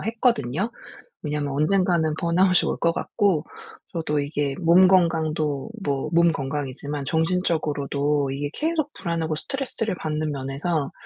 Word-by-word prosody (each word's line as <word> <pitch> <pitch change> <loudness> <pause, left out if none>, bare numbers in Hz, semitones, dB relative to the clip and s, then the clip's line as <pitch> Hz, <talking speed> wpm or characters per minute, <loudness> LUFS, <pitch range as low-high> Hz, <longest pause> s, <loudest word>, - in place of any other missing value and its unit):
했거든요. 220 - 0 0.5
왜냐하면 150 -2 -2
언젠가는 160 +1 +2
번아웃이 180 +2 +3
올 - - -2
것 170 - +2
같고 190 -5 0 0.5
저도 155 -3 -1
이게 145 -1 -1
'몸 180 +2 +6
건강도 160 -4 +1
뭐 140 -5 -1
몸 170 0 +5
건강이지만 140 0 -4
정신적으로도 150 -4 0
이게 145 +2 -3
계속 310 -2 -1
불안하고 165 -2 -2
스트레스를 225 - -2
받는 155 -1 -2
면에서 140 +2 -2
160 Hz, 320 characters per minute, -24 LUFS, 145-180 Hz, 0.5 s, 몸